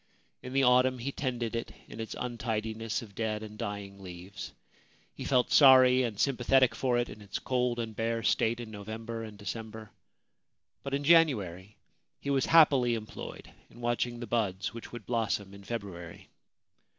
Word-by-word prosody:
In 125 - -8
the 135 0 +3
autumn 125 0 +4
he 125 +3 -3
tended 120 -4 -3
it 115 - -4 0.2
in - - -10
its 110 - -5
untidiness 115 -2 -3
of 105 -3 -13
dead 110 +1 -2
and 105 -1 -9
dying 100 -1 -6
leaves. 90 +1 -8 0.6
He - - -7
felt 125 -2 +2
sorry 130 -2 +7
and 115 -5 -2
sympathetic 130 -1 +3
for 125 +1 0
it 120 0 0
in 110 - -11
its 100 - -5
cold 125 -2 0
and 115 -2 -4
bare 115 +1 -1
state 115 +1 +2
in 115 -2 -7
November 110 +2 -6
and 110 -2 -9
December; 110 +1 -7 0.9
but 140 0 -2
in 140 - -2
January 105 - +3 0.4
he 140 - -3
was 135 -2 +2
happily 140 -7 +5
employed 110 -1 -8 0.2
in 120 - -16
watching 120 0 -1
the 120 - -5
buds 105 -4 -1
which 115 - -9
would 120 -4 -8
blossom 110 -4 -1
in 100 0 -12
February. 95 -7 -7
115 Hz, 165 wpm, -30 LUFS, 105-125 Hz, 0.9 s, sorry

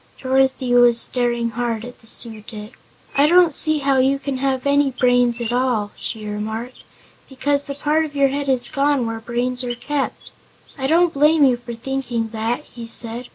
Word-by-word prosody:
Dorothy 265 -1 +1
was 240 -1 +6
staring 240 -2 0
hard 230 -1 -3
at 245 - -11
the 225 - -11
Su 225 -1 -3
dic. 215 +1 -10 0.4
"I 285 +2 +4
don't 350 -1 +5
see 310 +2 +2
how 275 -2 +1
you 270 +2 +2
can 275 -1 -4
have 265 0 -1
any 280 0 +3
brains 245 -2 +2
at 235 0 -3
all," 245 -5 0
she 220 -2 -6
remarked, 220 +4 -5 0.5
"because 280 +2 -1
the 280 - -5
part 300 +2 +1
of 295 -2 -7
your 280 -1 +3
head 280 0 -3
is 255 -2 +4
gone 280 -2 +1
where 225 0 -4
brains 245 +2 -3
are 240 -1 -3
kept." 285 +3 -4 0.4
"I 265 -2 -2
don't 335 +3 +3
blame 300 +1 +4
you 255 -2 +4
for 240 0 -8
thinking 240 -2 -3
that," 225 +5 -3
he 235 -4 -11
said. 235 +1 -3
250 Hz, 190 wpm, -20 LUFS, 235-280 Hz, 0.5 s, was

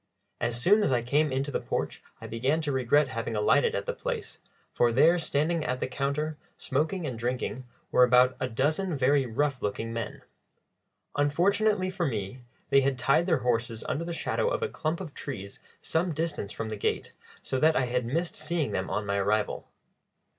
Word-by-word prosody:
As 120 0 0
soon 205 - +5
as 145 - +2
I 120 -2 +2
came 145 +4 +2
into 135 +2 -1
the - - 0
porch - - -3 0.2
I - - -9
began 130 +7 0
to 150 -2 -1
regret 135 +2 +3
having 115 -1 -3
alighted 450 - +3
at - - -2
the 485 - -2
place, - - -5 0.3
for 120 -1 +3
there, 160 +9 +5
standing 160 +1 0
at 125 -3 -2
the - - -1
counter, 140 +4 -2 0.2
smoking 160 +6 -1
and 125 -6 -4
drinking, 125 +1 -2 0.3
were 125 - +6
about 125 +1 +5
a 130 - -1
dozen 155 +8 0
very 135 0 +3
rough 135 +3 -1
looking 110 +3 -3
men. 115 -2 -5 0.9
Unfortunately 185 +7 +2
for 180 -3 -1
me, 110 +1 -4 0.3
they 140 - +6
had 135 -1 +1
tied 140 +7 +2
their 155 - +2
horses 115 -2 0
under 165 - -1
the 170 - -4
shadow 170 - 0
of - - -1
a 455 - 0
clump 160 - -2
of 165 -6 -7
trees 100 -8 -7 0.2
some 170 +1 0
distance 150 -10 -2
from 115 -1 -4
the 110 - -3
gate, - - -2 0.3
so 130 - -2
that 160 +3 +4
I 130 - +2
had 125 +1 0
missed 165 +9 -2
seeing 165 -3 -1
them 95 - -2
on 105 +2 -2
my 100 0 0
arrival. 105 +2 0
135 Hz, 190 wpm, -28 LUFS, 120-160 Hz, 0.9 s, were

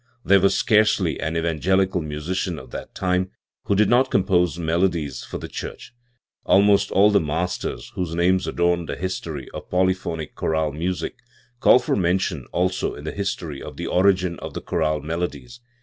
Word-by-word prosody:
There 100 0 +6
was 95 0 +3
scarcely 110 -1 +3
an 80 +2 -2
evangelical 90 +3 +1
musician 80 +4 -3
of 65 -3 -11
that - - -8
time 90 0 0 0.4
who 100 - +1
did 105 +1 +4
not 125 +2 +4
compose 90 -3 +2
melodies 80 -5 0
for - - -6
the - - -7
church. - - -8 0.5
Almost 100 0 +4
all 105 +2 +5
the 100 - +5
masters 85 +4 -3
whose 85 -3 -3
names 90 +2 +2
adorn 85 -1 +1
the - - -3
history 85 -7 -4
of - - -8
polyphonic 90 -4 -1
choral 80 -1 0
music 90 +4 -3 0.4
call - - +7
for 125 - 0
mention 90 -6 0
also 90 +1 0
in 75 - -10
the 80 - -4
history 95 -8 -4
of - - -9
the - - -4
origin 90 -2 +2
of - - -8
the - - -4
chorale 75 -2 -1
melodies. 90 +10 -4
90 Hz, 165 wpm, -23 LUFS, 80-95 Hz, 0.5 s, call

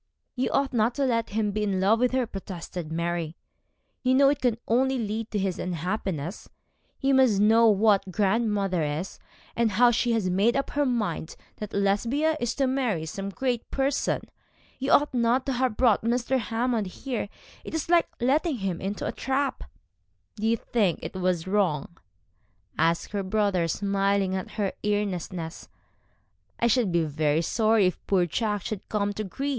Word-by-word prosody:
'You 255 0 0
ought 275 -1 0
not 230 +1 +2
to 280 - +1
let 230 -3 0
him 210 0 0
be 215 +1 -2
in 200 -3 0
love 205 +4 +3
with 250 0 +2
her,' 260 -1 +1
protested 180 -5 -7
Mary. 170 -1 -2 0.7
'You 255 -1 +2
know 275 +1 +6
it 285 0 -1
can 245 -3 +1
only 265 +3 +2
lead 220 0 -3
to 210 - -2
his 190 -2 -1
unhappiness. 180 -1 -3 0.5
You 275 0 +2
must 255 -7 +4
know 225 +3 +5
what 205 -2 +3
grandmother 200 -2 +1
is, 150 +5 -3 0.4
and 230 -3 +1
how 240 +4 +5
she 240 +1 +1
has 220 -5 0
made 200 +7 +2
up 275 - -2
her 290 -1 +1
mind 210 -10 -2 0.2
that 210 - -6
Lesbia 230 +11 +1
is 240 -1 -1
to 275 - +1
marry 250 -11 0
some 195 +5 -5
great 245 +3 -2
person. 275 0 0 0.6
You 270 +1 -1
ought 290 -1 +4
not 245 +1 +2
to 275 - -1
have 250 -3 0
brought 235 -5 +4
Mr. 245 +3 0
Hammond 230 -1 -1
here. 230 +2 -4 0.3
It - - -6
is 320 - -2
like 340 0 +4
letting 290 +6 +2
him 190 -4 -3
into 195 +2 -3
a - - -1
trap.' 270 0 -2 0.7
'Do 220 0 -2
you 230 +1 +3
think 205 -7 0
it - - -5
was 180 -3 0
wrong?' 180 -5 0 0.8
asked 165 +1 +1
her 205 -1 -1
brother, 190 -3 +1
smiling 195 +1 0
at 190 - -5
her 200 -3 -1
earnestness. 185 -5 -3 0.9
'I - - +2
should 235 -4 +2
be 170 -1 +2
very 155 +1 0
sorry 220 +2 +3
if 180 - -1
poor 185 -3 +3
Jack 205 +3 -1
should 215 -3 -6
come 205 -1 0
to 215 - -4
grief. 270 +9 -4
210 Hz, 175 wpm, -26 LUFS, 190-245 Hz, 0.9 s, know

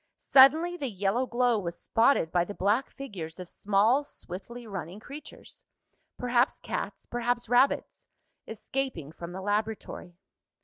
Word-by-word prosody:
Suddenly 315 +7 +6
the 275 -6 -3
yellow 205 +5 0
glow 240 -2 +2
was 170 -3 -5
spotted 225 -8 +2
by 175 -1 +3
the 205 +3 -7
black 210 +8 +1
figures 185 - -8
of 180 - -7
small 210 +10 +2
swiftly 235 0 -9
running 195 -2 -6
creatures 285 +6 -11 0.5
perhaps 245 +1 +1
cats, - - -5
perhaps 240 0 -1
rabbits 245 +4 +2 0.4
escaping 225 - -4
from 170 +1 -8
the 190 +2 -6
laboratory. 205 -4 -3
220 Hz, 130 wpm, -28 LUFS, 185-255 Hz, 0.5 s, Suddenly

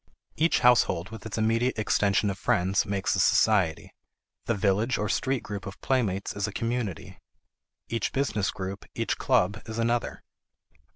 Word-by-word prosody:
Each 165 +3 +2
household 110 -7 +3
with 110 0 -8
its 110 - -6
immediate 115 +3 +1
extension 105 -1 +2
of 95 - -8
friends 95 +3 +1
makes 100 -1 0
a - - -1
society; 95 -4 +2 0.5
the 115 - 0
village 105 +4 +1
or 105 - -1
street 130 +3 -1
group 100 -1 -6
of 100 - -8
playmates 105 -8 -1
is 100 0 -1
a - - -5
community; 115 -4 -4 0.7
each 115 -2 -2
business 120 -8 0
group, 95 +1 -6
each - - -2
club, 100 +4 +1
is 110 0 -6
another. 120 +1 -1
105 Hz, 155 wpm, -27 LUFS, 95-115 Hz, 0.7 s, household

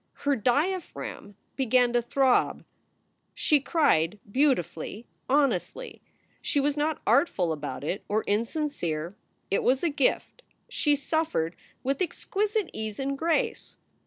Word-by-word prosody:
Her 285 -1 +3
diaphragm 280 - -1 0.2
began 250 -2 +3
to 240 - +3
throb. 260 +2 +2 0.7
She 300 - +3
cried 210 - +2
beautifully, 225 - 0 0.2
honestly. 295 - 0 0.4
She 290 - 0
was 285 +1 +1
not 305 +1 -1
artful 180 - +3
about 135 -3 -5
it, 180 +6 -3
or 215 +2 +1
insincere. 205 - -2 0.4
It 195 - +2
was 260 +4 +2
a 340 - +3
gift. 285 - 0 0.3
She 320 -12 +2
suffered 290 - -1 0.3
with 275 +4 -1
exquisite 410 +2 -1
ease 215 -1 -4
and 275 +1 -1
grace. 335 - -1
270 Hz, 120 wpm, -27 LUFS, 210-305 Hz, 0.7 s, Her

